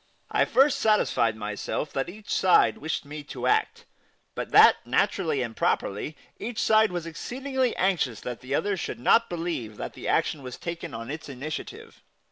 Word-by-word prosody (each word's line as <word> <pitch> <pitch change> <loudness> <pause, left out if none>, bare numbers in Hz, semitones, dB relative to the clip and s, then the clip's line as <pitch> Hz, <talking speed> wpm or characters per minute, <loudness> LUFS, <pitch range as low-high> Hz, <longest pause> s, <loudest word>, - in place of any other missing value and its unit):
I - - +3
first 270 +2 +3
satisfied 165 - +2
myself 105 +7 -4
that 135 +4 -1
each 210 +3 -7
side 185 -2 +4
wished 160 -1 -3
me 150 +1 -7
to - - -6
act, 435 +1 +1 0.5
but - - -4
that, - - +8
naturally 160 -8 +1
and 115 -2 -6
properly, 105 +10 -1 0.2
each 230 0 -4
side 220 -1 +4
was 175 -2 -4
exceedingly 260 - -2
anxious 165 - 0
that 125 -1 -5
the 130 +2 -2
other 205 +4 0
should 175 - -5
not 230 - +4
believe 165 -11 -4
that - - -5
the - - -7
action 150 - +1
was 125 -2 -7
taken 170 -3 -6
on 115 +3 -6
its 155 0 -7
initiative. 140 +3 -7
160 Hz, 170 wpm, -26 LUFS, 130-210 Hz, 0.5 s, that